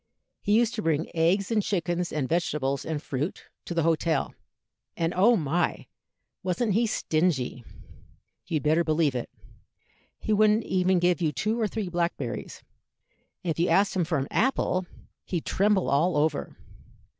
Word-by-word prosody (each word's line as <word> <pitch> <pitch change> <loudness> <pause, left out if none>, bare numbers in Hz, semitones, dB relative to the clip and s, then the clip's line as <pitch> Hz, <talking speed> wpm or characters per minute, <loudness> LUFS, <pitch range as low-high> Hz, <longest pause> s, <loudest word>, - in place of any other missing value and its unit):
He 205 - +1
used 235 0 +2
to 220 - -3
bring 160 -3 -1
eggs 185 +6 +2
and 220 -2 +3
chickens 175 -3 -1
and 145 -4 -1
vegetables 150 -5 -1
and 160 -2 -2
fruit 145 +2 -4 0.2
to 175 - -5
the 165 - +2
hotel; 165 -2 +1 0.6
and, 165 +1 0
oh 215 +6 +5
my! 170 -1 -1 0.6
wasn't 195 +4 0
he 230 +3 +2
stingy? 155 - 0 0.8
you'd 160 -5 -1
better 155 +3 +3
believe 155 -3 +1
it. 125 -2 -4 0.9
He 215 - -1
wouldn't 215 +1 +4
even 185 0 +2
give 175 0 +2
you 160 -3 +2
two 215 - -1
or 215 - +2
three 210 -1 -4
blackberries, 170 -8 -3 0.8
and 175 - 0
if 160 - -4
you 175 - +2
asked 200 +1 +3
him 185 - +2
for 160 -1 -1
an 135 0 -2
apple, 190 -7 +1 0.4
he'd 175 -4 -3
tremble 200 -1 +2
all 150 +4 +2
over. 150 -1 0
175 Hz, 155 wpm, -27 LUFS, 155-195 Hz, 0.9 s, oh